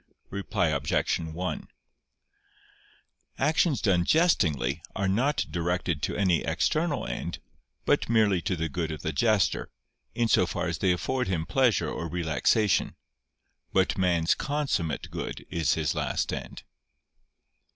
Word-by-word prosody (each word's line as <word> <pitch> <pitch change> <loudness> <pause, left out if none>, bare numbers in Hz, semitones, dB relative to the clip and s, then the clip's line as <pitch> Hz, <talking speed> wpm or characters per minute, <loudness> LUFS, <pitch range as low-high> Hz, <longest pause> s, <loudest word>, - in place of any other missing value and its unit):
Reply 100 -2 0
Obj. 70 -2 0
1: 80 +1 -4 1.7
Actions 150 +2 +2
done 90 -5 +3
jestingly 80 - +2
are 95 0 0
not 125 +10 +1
directed 85 -1 -1
to - - -2
any 95 -5 +2
external 155 -1 0
end; - - -4 0.5
but - - +2
merely 105 -6 +3
to 95 0 -1
the 80 -1 -2
good 80 +1 -3
of 75 - -7
the 80 - -2
jester, 110 -5 +2 0.5
in 120 -1 +2
so 95 -4 +4
far - - -2
as 85 -1 -2
they 95 - +3
afford 125 +8 -1
him 85 -4 -1
pleasure 125 +1 +2
or 85 - -4
relaxation. 85 +4 +1 0.8
But 95 -1 +2
man's 85 -3 +3
consummate 135 - -2
good - - -5
is 85 -2 +1
his 80 -3 0
last - - -1
end. - - -6
90 Hz, 130 wpm, -27 LUFS, 80-110 Hz, 1.7 s, so